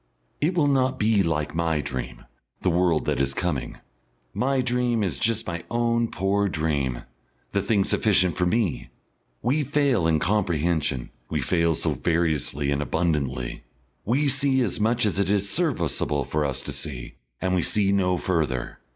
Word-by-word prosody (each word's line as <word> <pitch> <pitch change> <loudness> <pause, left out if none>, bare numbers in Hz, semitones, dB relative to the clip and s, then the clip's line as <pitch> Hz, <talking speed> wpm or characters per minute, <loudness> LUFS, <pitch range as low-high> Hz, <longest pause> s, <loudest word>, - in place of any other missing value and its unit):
It 165 +5 +1
will 160 -4 +3
not 135 -2 +2
be 105 -1 +3
like 80 -4 -1
my 80 -1 0
dream, 65 -4 -5 0.4
the 90 - +2
world 85 -2 +2
that - - 0
is 70 0 -1
coming. 85 -7 -2 0.6
My 135 +1 0
dream 125 -3 +1
is 80 -9 -1
just 115 0 +1
my 85 -2 -4
own 115 0 +1
poor 100 +2 0
dream, 70 -7 -1 0.5
the 100 - +1
thing 100 0 +2
sufficient 95 -5 +2
for 90 - +1
me. 90 - 0 0.5
We 140 +5 +1
fail 135 - +2
in 80 -1 +3
comprehension, 85 - 0 0.2
we - - -1
fail 85 -2 +1
so - - 0
variously 80 -4 0
and 70 0 0
abundantly. 75 -6 -1 0.4
We 135 +7 +1
see 135 -1 +2
as 105 -4 -1
much 115 +2 +2
as 100 -2 0
it 100 - +1
is 100 0 +1
serviceable 85 - 0
for 75 +3 -1
us 70 -2 -2
to - - -5
see, 60 -5 -4 0.3
and 95 0 -1
we 90 - +2
see 100 +2 +2
no 90 -2 +2
further. 75 -9 -2
90 Hz, 165 wpm, -25 LUFS, 75-115 Hz, 0.6 s, will